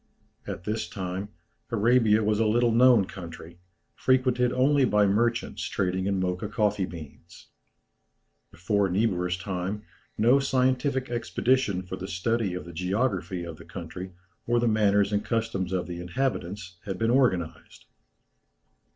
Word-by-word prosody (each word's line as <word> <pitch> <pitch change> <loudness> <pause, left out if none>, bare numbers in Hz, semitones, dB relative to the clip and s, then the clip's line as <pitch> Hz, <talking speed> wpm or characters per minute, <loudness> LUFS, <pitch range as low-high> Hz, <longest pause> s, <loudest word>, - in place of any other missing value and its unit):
At - - -5
this 105 -3 -3
time 95 +2 -4 0.4
Arabia 115 -1 +3
was 105 0 +1
a 110 - +3
little 120 +2 +3
known 120 -3 +5
country, 85 -2 -10 0.3
frequented 125 -1 +2
only 140 +2 +3
by 105 -4 +4
merchants 115 +4 0
trading 95 0 -1
in 100 -1 0
Mocha 90 +2 -2
coffee 105 -3 0
beans. 85 +1 -12 1.0
Before 100 +3 0
Niebuhr's 90 -2 0
time 95 +2 -4 0.3
no 120 +6 +5
scientific 130 -1 0
expedition 120 -4 0
for 95 +1 -6
the 95 - -6
study 100 +1 -1
of 90 - -6
the 85 - -10
geography 95 0 -1
of 85 -2 -7
the 85 - -12
country 90 +2 -8 0.4
or 120 0 +3
the 120 - +1
manners 105 -2 +3
and 105 - +1
customs 110 -6 -2
of 90 -3 -1
the 85 0 -6
inhabitants 90 -2 -3
had 95 -2 -4
been 115 +3 +1
organized. 105 -11 0
100 Hz, 140 wpm, -27 LUFS, 90-120 Hz, 1.0 s, known